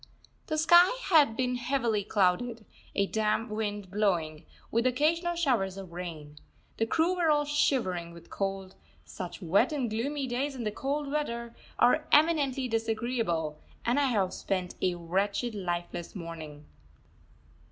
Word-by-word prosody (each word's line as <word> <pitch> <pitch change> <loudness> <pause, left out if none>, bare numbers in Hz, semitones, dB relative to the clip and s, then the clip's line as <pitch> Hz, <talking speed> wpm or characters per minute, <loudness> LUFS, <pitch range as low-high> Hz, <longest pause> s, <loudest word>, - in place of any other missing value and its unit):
The 310 - -1
sky 345 +8 +6
had 290 -9 +5
been 250 -1 0
heavily 240 -4 0
clouded, 215 +4 +1 0.3
a 200 - +3
damp 215 +2 0
wind 205 -3 -3
blowing, 175 -7 0 0.2
with 235 +2 +2
occasional 330 +7 +1
showers 235 - +1
of 190 -3 -8
rain. 160 -4 -7 0.4
The 225 - +1
crew 330 +8 +2
were 340 -3 +2
all 295 -1 +3
shivering 210 -12 0
with 170 0 -14
cold. 195 -1 -3 0.3
Such 185 +1 -7
wet 195 - +3
and 265 -7 -1
gloomy 275 +6 -2
days 265 +3 -2
in 245 - -5
the 210 - -1
cold 280 +5 -3
weather 235 -6 -3 0.2
are 245 - +3
eminently 290 -4 +3
disagreeable, 225 -9 -1 0.3
and 245 +4 +2
I 285 - +3
have 200 -8 +1
spent 185 -2 -2
a 180 -1 +1
wretched 195 +7 -1
lifeless 175 -3 -4
morning. 160 -4 -8
225 Hz, 140 wpm, -29 LUFS, 185-275 Hz, 0.4 s, sky